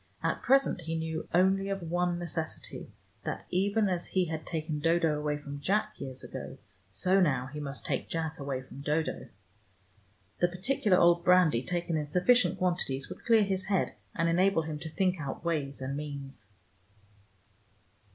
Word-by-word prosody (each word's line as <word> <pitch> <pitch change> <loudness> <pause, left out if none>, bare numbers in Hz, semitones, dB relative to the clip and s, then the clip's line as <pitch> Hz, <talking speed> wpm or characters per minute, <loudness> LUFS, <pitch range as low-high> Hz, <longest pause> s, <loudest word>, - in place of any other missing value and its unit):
At - - 0
present 270 -7 +3
he 165 0 -3
knew 160 0 -4
only 190 +2 +3
of 195 -2 -2
one 175 +1 0
necessity, 165 -2 -4 0.3
that, - - -4
even 200 +4 +2
as 180 -2 -1
he 185 -1 +1
had 160 -1 -5
taken 155 -2 -2
Dodo 165 0 +2
away 150 0 -1
from 145 -1 -7
Jack 200 +9 0
years 130 -1 -6
ago, - - -7 0.3
so 180 - +3
now 130 -8 +2
he 150 - -5
must 140 -1 -6
take - - -2
Jack 160 -1 -3
away 135 -2 -3
from 135 +1 -11
Dodo. 150 +2 -1 1.1
The 175 - +4
particular 185 +2 +1
old 170 0 +5
brandy, 180 -9 +5
taken 175 +1 -1
in 150 -1 -2
sufficient 190 +6 +3
quantities, 170 -8 -1
would 180 - -9
clear 225 -2 +5
his 190 -1 -1
head, 195 -2 +1 0.2
and 165 0 +1
enable 175 0 +3
him 155 -1 -5
to 160 - -6
think 180 +1 0
out 140 +3 -5
ways 140 -5 -1
and 135 +1 -3
means. 140 -6 -7
165 Hz, 165 wpm, -30 LUFS, 150-185 Hz, 1.1 s, old